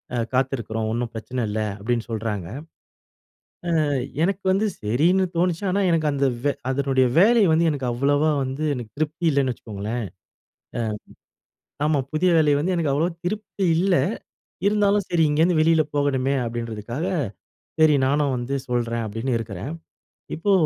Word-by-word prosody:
அ - - 0 0.2
காத்துருக்றோம். 115 -4 -1
ஒண்ணு 120 +2 -1
பிரச்சன 115 +3 -4
இல்ல 105 +1 -2 0.2
அப்டின்னு 115 +3 -1
சொல்றாங்க. 105 -5 -3 1.4
அ - - 0 0.4
எனக்கு 195 +3 0
வந்து 195 +3 +2
சரின்னு 160 - +2
தோணுச்சு, 175 +1 +1
ஆனா 195 +2 +1
எனக்கு 165 -2 +2
அந்த 140 0 +1 0.2
வே 145 - +3 0.2
அதனுடைய 135 -1 +2
வேலை 225 +5 +6
வந்து 165 +2 +3
எனக்கு 140 -4 -3
அவ்வளவா 145 +5 +2
வந்து 135 +3 -3
எனக்கு 120 -4 -6
திருப்தி 155 +3 -2
இல்லன்னு 135 -3 +1
வச்சுக்கோங்களேன். 110 +1 -5 0.8
அ, - - 0 1.0
ஆமா. 150 -2 +2
புதிய 175 +4 +2
வேலை 150 -2 +4
வந்து 180 +5 0
எனக்கு 160 -5 0
அவ்ளவா 165 +5 +1
திருப்தி 200 0 -2
இல்ல. 180 +2 +3 0.7
இருந்தாலும் 205 -1 +2
சரி 170 -2 +3
இங்கேருந்து 160 +3 +3
வெளில 160 0 +4
போகணுமே 140 -2 +1
அப்டின்றதுக்காக, 115 - -4 0.7
சரி 155 -1 +6
நானும் 140 0 +1
வந்து 120 +3 -3
சொல்றேன் 115 -1 -1
அப்டின்னு 115 +4 -2
இருக்கறேன். 110 - -6 0.6
இப்போ 200 +5 +1
140 Hz, 140 wpm, -23 LUFS, 120-165 Hz, 1.4 s, வேலை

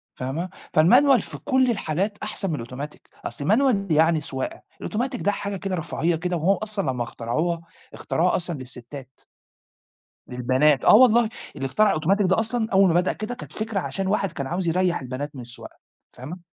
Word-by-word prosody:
فاهمة؟ 150 +8 -4 0.3
فالmanual 250 - +6
في - - -8
كُلّ 260 -3 +2
الحالات 200 +1 -2
أحسن 205 -4 -3
من 120 -6 -3
الautomatic، 140 +4 -7 0.3
أصل 145 - -5
الmanual 210 - +2
يعني 160 0 +4
سواقة، 130 -1 -4 0.2
الautomatic 245 +3 -2
ده 205 - +2
حاجة 200 0 -4
كده 190 0 -3
رفاهية 165 0 -1
كده، 175 +2 -2
وهو 190 +5 +3
أصلًا 205 -10 -2
لمّا 125 -2 -2
اخترعوها، 155 +10 -2 0.3
اخترعوها 175 +3 0
أصلًا 175 -2 -2
للستات. 130 +1 -9 1.1
للبنات، 130 +4 +2
آه - - +8
والله، 235 -2 +6 0.3
اللي 135 - -4
اخترع 205 +9 +3
الautomatic 195 +6 +2
ده 190 +3 +3
أصلًا، 225 0 -1
أول 195 0 +6
ما 165 - +2
بدأ 185 - -1
كده 215 +3 -5
كانت - - -10
فكرة 220 -2 -2
عشان 195 +1 -3
واحد 195 -1 0
كان 140 -2 -4
عاوز 175 +3 -2
يريح 180 -1 +1
البنات 135 +3 -5
من 130 - -7
السواقة، 120 0 -9 0.4
فاهمة؟ 150 +9 -8
175 Hz, 175 wpm, -24 LUFS, 145-210 Hz, 1.1 s, آه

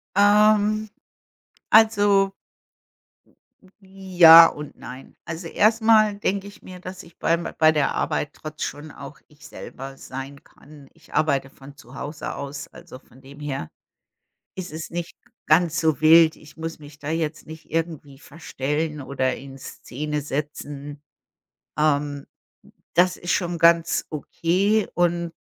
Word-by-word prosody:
Ähm, 210 +1 +4 0.8
also 205 -3 +4 1.5
ja 185 -4 +7
und 150 -2 -9
nein. 130 +1 -11
Also, 165 +1 -6
erstmal 215 +1 +3
denke 200 -1 -2
ich 205 - -14
mir, 185 -1 -11
dass 185 +1 -9
ich 170 - -19
beim 170 +1 0
bei 155 0 +5
der 150 -3 +1
Arbeit 150 - -2
trotz 155 0 -8
schon 150 +1 -6
auch 140 0 -11
ich 150 - -19
selber 135 +1 -10
sein 135 +2 -9
kann. 145 -1 -17
Ich - - -21
arbeite 140 -3 +1
von 140 +1 -15
zu 130 -3 -16
Hause 145 +2 -6
aus, 140 0 -7
also 170 -7 -13
von 130 - -22
dem 140 +2 -14
her 135 - -5 0.9
ist 185 -4 -7
es 160 0 -7
nicht 175 0 -6 0.3
ganz 170 +1 +3
so 160 -4 +1
wild. 160 0 +6
Ich 155 0 -17
muss 165 0 -6
mich 150 0 -14
da 145 - -8
jetzt 155 -1 -3
nicht 160 0 -12
irgendwie 160 -4 -4
verstellen 150 0 -4
oder 130 -1 -2
in 135 0 -11
Szene 150 +3 -5
setzen. 145 0 -6 0.8
Ähm, 145 -2 0 0.7
das 180 +1 +3
ist 175 - -6
schon 175 -2 -1
ganz 170 0 +3
okay 185 +7 0
und 170 -1 0
160 Hz, 135 wpm, -23 LUFS, 145-180 Hz, 1.5 s, ja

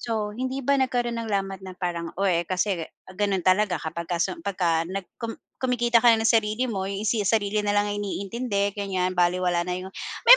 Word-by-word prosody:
So 215 -3 -2
hindi 260 +2 -2
ba 280 +2 +2
nagkaroon 245 -3 0
ng 230 -1 -4
lamat 195 -1 -1
na 185 - -7
parang, 175 -2 -3
"Oh, 200 - +3
eh, 170 -1 +2
kasi 185 -1 0 0.3
ganon 200 -2 +1
talaga 185 -1 +2
kapag 170 +2 -4
ka 175 -1 -1
sum 335 - -1
pagka 170 -4 +1
nag 190 +1 -5
kum 230 -1 -4 0.2
kumikita 240 -2 +2
ka 240 -1 +7
na 225 - +2
ng - - +5
sarili 225 +2 +2
mo, 195 -4 -2
eh, 195 0 -3
si 215 -3 +1
sarili 210 0 +1
na 205 - +1
lang 205 0 +2
ang 205 - -2
iniintindi 200 +1 -2
ganyan 185 -2 -1
balewala 175 0 +2
na 180 - -3
'yong" 185 +1 -5 0.4
may - - +13
200 Hz, 215 wpm, -25 LUFS, 185-225 Hz, 0.4 s, may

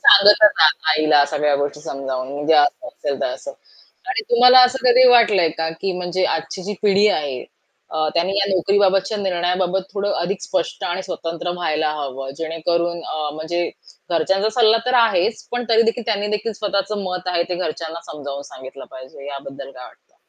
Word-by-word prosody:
सांगतच 210 - +7 0.2
आ 160 - +8 0.2
आईला 155 -2 +4
सगळ्या 145 0 0
गोष्टी 145 +1 -3
समजावून, 135 -3 -5
म्हणजे 145 +3 +1
असं 145 -1 +2
असेल, 140 -3 -5
तर - - 0
असं 280 - -6 0.6
आणि 390 +2 -1
तुम्हाला 250 +2 +7
असं 260 +1 -4
कधी 250 +1 +6
वाटलंय 215 -8 +4
का? 160 0 -1
की 195 - -1
म्हणजे 180 +1 -2
आजची 165 +3 -5
जी 205 +3 -4
पिढी 205 0 +4
आहे, 145 -9 -2 0.5
अ, 155 0 -1
त्यांनी 175 +3 0
या 200 - +2
नोकरीबाबतच्या 195 +2 +1
निर्णयाबाबत 185 0 -1
थोडं 200 0 -1
अधिक 190 +3 -3
स्पष्ट 185 - -3
आणि 180 +2 -3
स्वतंत्र 170 -1 -5
व्हायला 155 -2 -1
हवं. 135 -1 -6
जेणेकरून 170 +1 -2
अ, 155 -1 -3
म्हणजे 170 +2 -3 0.4
घरच्यांचा 190 +5 +1
सल्ला 225 -1 +5
तर 250 - 0
आहेच, 225 0 0
पण 245 0 -2
तरी 225 0 +5
देखील 230 0 -5
त्यांनी 205 -2 -1
देखील 220 +2 -5
स्वतःचं 205 0 -2
मत 180 0 -5
आहे, 175 -1 +1
ते 180 - -2
घरच्यांना 165 -1 -5
समजावून 140 -2 -7
सांगितलं 130 +1 -11
पाहिजे. 130 +2 -11
याबद्दल 140 -1 -8
काय 125 -2 -12
वाटतं? - - -20
175 Hz, 170 wpm, -20 LUFS, 155-200 Hz, 0.6 s, आ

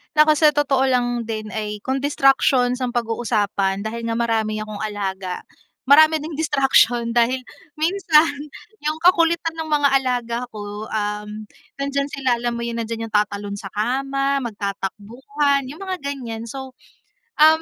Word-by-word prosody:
Naku, 305 0 +6
sa 300 -1 +5
totoo 275 -2 +2
lang 245 -2 0
din 215 -1 -5
ay 210 -1 -4
kung 265 +1 -1
distractions 270 -3 +3
ang 250 -2 -2
pag-uusapan, 205 -4 0
dahil 230 +1 -4
nga 230 - -1
marami 220 -2 0
akong 215 -1 -7
alaga, 195 -3 -4 0.4
marami 310 +3 +6
ding 310 0 -6
distraction. 270 -6 +3
Dahil 245 +2 +2 0.4
minsan, 325 -2 +4 0.6
'yung 305 +1 -1
kakulitan 335 -2 +3
ng 320 -1 -5
mga 290 -1 +4
alaga 245 -3 -2
ko, 210 0 -7
um, 210 0 -4 0.4
nandiyan 280 0 -1
sila, 260 -3 0
alam 240 0 -1
mo 235 - -4
'yun, 235 0 -3
nandiyan 225 0 -4
'yung 215 - -6
tatalon 205 -1 0
sa 195 - -7
kama, 275 +5 0
magtatakbuhan, 235 +7 -2
'yung 295 +5 -9
mga 375 -1 -3
ganyan. 245 -5 -5
So, 265 +2 -7 0.7
um 315 +1 +6
245 Hz, 145 wpm, -21 LUFS, 215-280 Hz, 0.7 s, Naku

